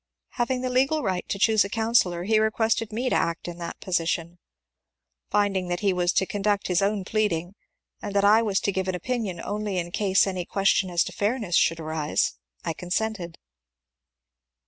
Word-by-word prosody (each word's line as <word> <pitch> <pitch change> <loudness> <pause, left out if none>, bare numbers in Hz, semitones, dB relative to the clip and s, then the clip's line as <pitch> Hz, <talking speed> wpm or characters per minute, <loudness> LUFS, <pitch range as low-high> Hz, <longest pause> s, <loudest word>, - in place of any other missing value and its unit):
Having 250 +1 -1
the 255 0 -2
legal 270 +4 +2
right 185 -3 -2
to - - -1
choose 220 +1 +4
a 200 - -5
counsellor 220 -6 +1
he 215 +3 +3
requested 220 0 +1
me 240 +4 -2
to - - +1
act 170 +1 -1
in 175 0 -7
that 170 -1 -6
position. 170 -2 -2 0.9
Finding 200 -3 +1
that 175 0 -2
he 200 -2 +2
was 180 -1 +1
to 190 - +2
conduct 205 +1 -1
his 180 +1 +2
own 200 -1 0
plead 215 0 +1
ing, 170 +3 -3 0.5
and 205 -1 -5
that 200 0 +3
I 215 +2 +6
was 205 -4 +1
to 200 - 0
give 190 0 -2
an 185 - -1
opinion 205 -2 -3
only 205 +1 -3
in 175 -1 -3
case 195 0 +3
any 185 -2 -2
ques 195 +3 +1
tion 190 - +2
as 175 -1 +2
to - - -6
fairness 210 -4 -1
should 165 0 +3
arise, 155 -1 -1 0.3
I - - -1
consented. 180 0 -3
195 Hz, 190 wpm, -25 LUFS, 175-220 Hz, 0.9 s, I